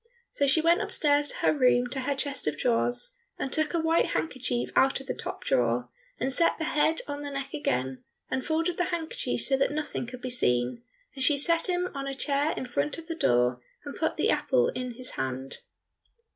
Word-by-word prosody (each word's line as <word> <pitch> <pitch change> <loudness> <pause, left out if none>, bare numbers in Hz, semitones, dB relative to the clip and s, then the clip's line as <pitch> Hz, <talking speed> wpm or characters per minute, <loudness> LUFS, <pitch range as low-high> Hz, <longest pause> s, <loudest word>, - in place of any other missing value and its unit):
So 280 - +1
she 295 +4 +4
went 335 +2 +4
upstairs 290 -1 +2
to - - -1
her - - +5
room 250 -3 +3
to 270 - -1
her 280 +2 -1
chest 280 - 0
of 150 -1 0
drawers, 245 - 0 0.3
and 270 - -3
took 315 +1 +1
a - - +2
white 325 +1 +2
handkerchief 250 -5 -2
out 270 0 +4
of 270 - -10
the - - -2
top - - -6
drawer, 120 0 +1 0.3
and 260 +2 0
set 335 +5 +4
the 320 - -3
head 315 +1 +2
on 285 0 -4
the 290 - -5
neck 275 -1 -5
again, 130 - -2 0.2
and 260 - -2
folded 330 +3 0
the 355 - +1
handkerchief 340 -3 -2
so 270 - +2
that 270 - +2
nothing 295 -5 -3
could 250 +1 -9
be 255 - -3
seen, 125 - +1 0.3
and 265 - -3
she 290 +2 +4
set 335 +4 +3
him 360 0 +1
on 275 0 -4
a 275 - -3
chair 285 +2 0
in - - -3
front 150 - -1
of 330 - -9
the 330 - -4
door, 125 - +2 0.2
and - - -6
put - - -1
the - - +2
apple 120 - +2
in 250 -1 -5
his 255 +1 -4
hand. 130 0 -4
275 Hz, 215 wpm, -28 LUFS, 240-315 Hz, 0.3 s, her